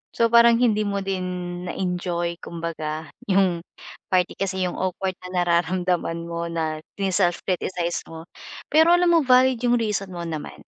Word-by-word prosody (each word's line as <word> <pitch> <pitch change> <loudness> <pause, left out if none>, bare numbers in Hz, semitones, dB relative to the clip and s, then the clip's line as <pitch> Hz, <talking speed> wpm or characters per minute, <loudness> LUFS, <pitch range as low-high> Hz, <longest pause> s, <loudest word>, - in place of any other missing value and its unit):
So, 230 0 +2
parang 235 0 +7
hindi 215 -3 +2
mo 200 -1 -2
din 190 -1 -2 0.4
na-enjoy 175 -2 -2
kumbaga 160 -2 -5 0.2
yung 190 -3 +3 0.5
party 180 -1 0
kasi 190 -1 -1
yung 180 - -3
awkward 185 0 -2
na 180 -1 -1
nararamdaman 175 -1 0
mo 170 0 -4
na 160 -2 -2 0.2
sine-self 190 -3 0
criticize 180 -2 -2
mo. 160 0 -9 0.5
Pero 320 +3 +6
alam 350 0 +3
mo 335 - +6
valid 255 -1 +5
yung 245 0 +3
reason 210 -4 -1
mo 170 - -5
naman 160 -3 -6
185 Hz, 150 wpm, -23 LUFS, 170-205 Hz, 0.5 s, parang